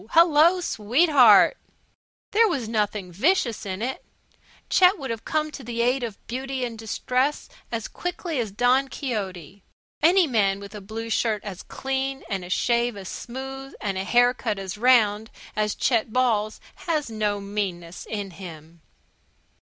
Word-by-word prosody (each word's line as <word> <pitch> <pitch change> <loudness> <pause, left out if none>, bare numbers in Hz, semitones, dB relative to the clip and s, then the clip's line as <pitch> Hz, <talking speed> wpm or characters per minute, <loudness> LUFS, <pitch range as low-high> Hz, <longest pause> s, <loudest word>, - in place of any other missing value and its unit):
Hello, 335 +2 +6
sweetheart!" 255 - +5 0.7
There 450 +2 +5
was 275 - -2
nothing 210 -4 -1
vicious 235 - +1
in 190 +3 -4
it, 260 +2 -3 0.6
Chet 370 +2 +5
would 270 -6 -5
have 225 -1 -6
come 310 -1 -1
to 275 - -9
the 235 0 -2
aid 250 +2 +2
of 230 -4 -5
beauty 260 +1 -3
in 235 -2 -6
distress 250 +5 -1 0.2
as 230 -2 -3
quickly 350 -4 -4
as 225 -3 -1
Don 245 +6 +2
Quixote. 200 - -5 0.4
Any 355 +3 +5
man 200 -8 +1
with 200 +1 -10
a 210 - -8
blue 225 +3 -6
shirt 215 -2 0
as 195 -4 -7
clean, 270 0 -3
and 195 -2 -2
a 180 - -9
shave 235 +3 +1
as 190 -2 -7
smooth, 270 +2 -7
and 200 -2 -2
a 190 - -2
haircut 245 0 +2
as 195 -1 -5
round 220 -2 +3 0.3
as 210 0 0
Chet 230 -3 +1
Ball's 220 -4 +1 0.3
has 305 -7 0
no 210 -2 -1
meanness 190 -4 -4
in 205 -3 -4
him. 165 -3 -11
230 Hz, 150 wpm, -24 LUFS, 205-270 Hz, 0.7 s, Hello